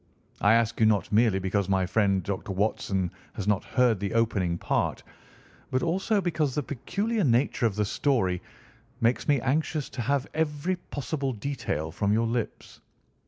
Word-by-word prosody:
I 105 +2 +6
ask 115 0 +1
you 110 - +5
not 105 -5 +1
merely 110 -2 +4
because 95 +1 -1
my 95 -1 +2
friend 100 -1 +2
Dr. 95 +1 -4
Watson 95 -2 0 0.2
has 100 - -5
not 105 -2 +2
heard 120 -5 +2
the 100 +2 -3
opening 95 -7 +1
part - - -1 0.7
but 130 - 0
also 190 +5 +1
because 155 -7 0
the 150 - 0
peculiar 200 - -2
nature 120 -2 +2
of 105 - -4
the 105 0 +1
story 100 -7 +1 0.6
makes 120 0 +1
me 145 -3 +4
anxious 150 +2 0
to 125 - -5
have 140 +3 0
every 160 +3 -1
possible 140 0 -2
detail 105 - -3
from 100 +4 0
your 115 +2 +2
lips. 115 0 -4
115 Hz, 165 wpm, -27 LUFS, 100-145 Hz, 0.7 s, I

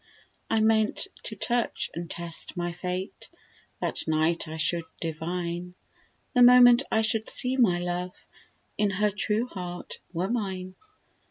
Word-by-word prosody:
I 225 - +2
meant 220 -1 +2 0.2
to - - -4
touch 240 -1 -1
and 170 0 -6
test 170 +1 -6
my 175 0 -1
fate; 180 +2 -5 0.5
That - - -3
night 160 +2 +1
I 160 +1 -6
should 165 +1 +1
divine, 170 +2 -4 0.6
The 250 - +4
moment 245 0 +8
I 220 - +3
should 220 0 +1
see 255 +1 +2
my 220 -9 +4
love, 175 +1 -4 0.5
If 205 -2 +2
her 210 +2 +2
true 210 +3 0
heart 180 -6 -7
were 180 +1 -1
mine. 190 -5 -3
185 Hz, 140 wpm, -27 LUFS, 175-220 Hz, 0.6 s, moment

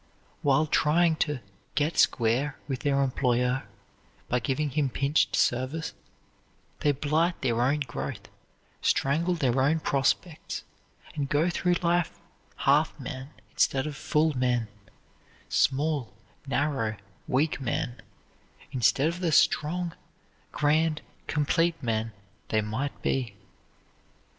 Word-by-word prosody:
While 145 +2 +3
trying 160 +2 +3
to 150 -5 -1 0.3
"get 150 +2 +1
square" 125 +5 +2
with 135 -3 -2
their 140 -1 +2
employer, 125 -1 +1 0.6
by 125 - +2
giving 140 +4 -1
him 145 0 +1
pinched 140 +4 +1
service, 130 +6 0 0.9
they 145 - +3
blight 155 +5 +1
their 120 -2 +1
own 140 +4 +2
growth, 130 -4 -5 0.5
strangle 165 +6 +2
their 130 -5 +1
own 155 +5 +3
prospects, 150 +4 -1 0.5
and 140 -2 -3
go 155 +5 +2
through 180 0 +1
life 175 0 +1 0.4
half - - +2
men 130 +1 -6 0.2
instead 135 -1 +2
of 150 -1 -4
full 150 +1 +1
men 125 -3 +1 0.8
small, 140 -4 +1 0.4
narrow, 135 -6 0 0.3
weak 145 +3 +1
men, 125 -1 -2 0.7
instead 130 +3 +3
of 170 +2 -2
the 175 -3 0
strong, 170 +3 +2 0.6
grand, 155 +1 +1 0.2
complete 165 +3 +2
men 115 -1 -1 0.4
they 110 - +2
might 110 +7 -4
be. 120 -6 -1
140 Hz, 115 wpm, -28 LUFS, 125-155 Hz, 0.9 s, While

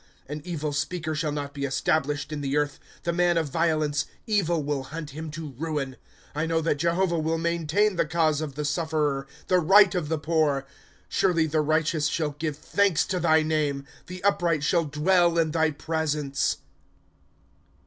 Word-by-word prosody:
" - - -33
An 150 +2 -5
evil 155 -4 -3
speaker 155 +3 -2
shall 155 -1 -1
not 145 -1 -4
be 140 - -5
established 145 +2 0
in 150 -1 -3
the 140 +1 -1
earth; 145 -1 -1 0.2
The 170 - 0
man 175 0 +2
of 160 -3 0
violence, 155 -3 +1 0.2
evil 175 -7 +1
will 140 -2 -2
hunt 155 +1 -7
him 155 +3 -6
to 155 -1 -7
ruin. 150 -4 -2
'^ - - -15 0.4
r 155 +3 -1
know 165 0 +1
that 160 -2 0
Jehovah 170 +1 +1
wUi 160 +1 0
maintain 170 +4 +1
the - - +2
cause 160 -2 +1
of 145 -4 -5
the 150 0 -3
sufferer, 150 -3 0 0.2
The 185 - +3
right 195 +3 +6
of 175 -5 -2
the 160 - 0
poor. 155 -2 +1
^^ - - -26 0.4
Surely 170 -4 +2
the 155 0 +1
righteous 155 0 +1
shall 150 0 -1
give 150 0 -4
thanks 200 +2 +2
to 185 - -2
thy 160 -2 +4
name; 150 -3 0 0.2
The 180 0 -8
upright 175 -6 +2
shall 170 +1 +2
dwell 170 +3 +2
in 160 -2 +2
thy 160 0 +2
presence. 150 -2 -1
155 Hz, 185 wpm, -26 LUFS, 150-170 Hz, 0.4 s, right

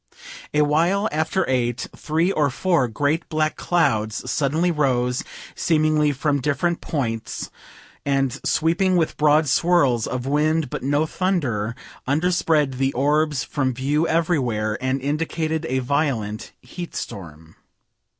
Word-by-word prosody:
A 150 - +2
while 170 +8 +2
after 160 +5 0
8, 120 -2 -1
three 165 +4 0
or 150 -6 +2
four 155 0 +1
great 145 +8 -1
black 155 -1 0
clouds 115 -12 0
suddenly 155 +5 +1
rose, 125 -5 0 0.3
seemingly 155 -2 +2
from 145 0 0
different 165 +5 0
points, 115 -7 -3 0.5
and 135 -2 0
sweeping 170 +4 +2
with 165 -2 0
broad 150 +1 +3
swirls 140 -7 +2
of 125 0 -3
wind 150 +1 +1
but - - -4
no 145 +3 +1
thunder, 135 - -1 0.3
underspread 155 -2 +1
the 135 0 +2
orbs 150 0 +1
from 130 -4 -1
view 145 +5 0
everywhere, 130 -11 0
and 130 +1 -1
indicated 160 +2 -1
a 130 - 0
violent 125 -6 -1
heatstorm. 90 - -8
145 Hz, 120 wpm, -22 LUFS, 130-160 Hz, 0.5 s, broad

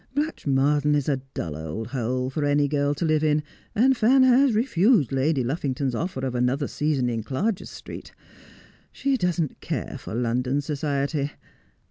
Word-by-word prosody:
Blatchmardean 150 - +1
is 145 -2 0
a 140 -3 +2 0.2
dull 80 -3 -3
old 80 +9 -5
hole 125 0 -2
for 150 +2 -2
any 145 0 +2
girl 145 0 0
to 170 - -2
live 155 -1 +2
in, 150 0 +2 0.3
and 260 +5 +4
Fan 255 +4 +5
has 260 -1 +5
refused 210 - +3
Lady 135 0 +1
Luff 135 +8 -2
ington's 135 -1 -1
offer 160 +1 -3
of 130 - -2
another 125 +3 0
season 150 -4 0
in 115 -2 -1
Clarges 175 - -2
Street. - - -9 0.8
She 275 0 0
doesn't 175 - -1
care - - -4
for - - -7
London 125 +3 0
society. 145 0 -1
145 Hz, 160 wpm, -25 LUFS, 130-170 Hz, 0.8 s, Fan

